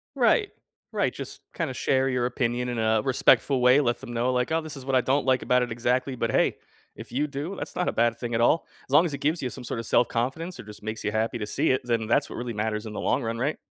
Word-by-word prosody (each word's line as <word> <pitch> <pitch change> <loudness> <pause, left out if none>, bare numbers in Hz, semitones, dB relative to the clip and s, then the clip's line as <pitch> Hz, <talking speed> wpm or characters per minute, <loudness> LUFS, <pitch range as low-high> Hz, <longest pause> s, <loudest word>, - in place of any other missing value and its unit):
Right. 420 -4 +3 0.4
Right, - - +1
just - - -8
kinda 160 -7 -2
share 130 +1 +1
your 125 -2 +1
opinion 125 0 -1
in 120 - -3
a 110 -1 +2
respectful 130 +2 +3
way. 125 +4 +6
Let 120 -3 0
them 120 - -8
know, 120 +2 +1
like, 125 +3 0
"Oh, 160 0 +2
this 155 -2 -8
is 130 - -9
what 135 -1 0
I 130 - +5
don't 135 +4 +1
like 130 -1 +3
about 125 0 +2
it 120 - -4
exactly, 125 +3 0
but 115 -2 -1
hey, - - +2 0.4
if - - -10
you 140 +4 0
do, 150 +6 -5
that's - - -7
not 180 - 0
a - - 0
bad 115 0 +1
thing 120 -1 -3
at 115 - +1
all. 155 +7 +3 0.2
As - - -15
long 145 +4 +7
as 155 - -3
it - - -5
gives 155 +4 0
you 125 - -2
some 130 - -9
sorta 115 -1 -4
self-confidence 125 +9 0
or - - -7
just 105 -1 -12
makes 110 +1 -5
you 105 - -1
happy 110 +2 -1
to 105 - -4
see 150 0 +1
it, 130 - +1
then 115 -2 0
that's 115 - +1
what - - -7
really 120 0 -4
matters 105 +1 -2
in 110 - -6
the - - -4
long - - 0
run, 115 +1 -3
right?" 140 +5 0
125 Hz, 280 wpm, -26 LUFS, 115-135 Hz, 0.4 s, long